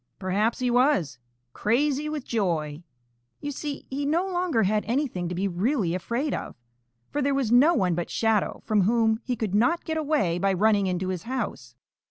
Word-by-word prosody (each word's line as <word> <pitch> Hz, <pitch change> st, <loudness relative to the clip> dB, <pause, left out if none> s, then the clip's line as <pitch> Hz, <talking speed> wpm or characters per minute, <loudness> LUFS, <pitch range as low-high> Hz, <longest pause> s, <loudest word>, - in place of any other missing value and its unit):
Perhaps 205 Hz, +4 st, 0 dB
he 250 Hz, -1 st, 0 dB
was 240 Hz, -, +2 dB, 0.3 s
crazy 285 Hz, +6 st, +1 dB
with 300 Hz, -3 st, -4 dB
joy. 165 Hz, -8 st, -1 dB, 0.6 s
You 290 Hz, -1 st, -4 dB
see, 285 Hz, 0 st, -5 dB
he 280 Hz, +2 st, -2 dB
no 320 Hz, +6 st, +1 dB
longer 355 Hz, -10 st, 0 dB
had 210 Hz, +2 st, +1 dB
anything 230 Hz, -, -1 dB
to 180 Hz, -, -4 dB
be 195 Hz, +3 st, 0 dB
really 195 Hz, -, 0 dB
afraid 235 Hz, -, -2 dB
of, -, -, -5 dB, 0.6 s
for 290 Hz, -, -1 dB
there 280 Hz, 0 st, +1 dB
was 265 Hz, -5 st, 0 dB
no 285 Hz, +8 st, +6 dB
one 180 Hz, -, +2 dB
but 175 Hz, 0 st, -3 dB
Shadow 225 Hz, -3 st, 0 dB
from 215 Hz, -2 st, +2 dB
whom 220 Hz, +2 st, +2 dB
he 250 Hz, -, -2 dB
could 220 Hz, -4 st, -3 dB
not 245 Hz, +12 st, +2 dB
get 320 Hz, 0 st, -2 dB
away 290 Hz, -, 0 dB
by 195 Hz, +1 st, +2 dB
running 205 Hz, +1 st, +3 dB
into 185 Hz, 0 st, -1 dB
his 185 Hz, -2 st, -3 dB
house. 205 Hz, -, -4 dB
225 Hz, 185 wpm, -26 LUFS, 185-280 Hz, 0.6 s, no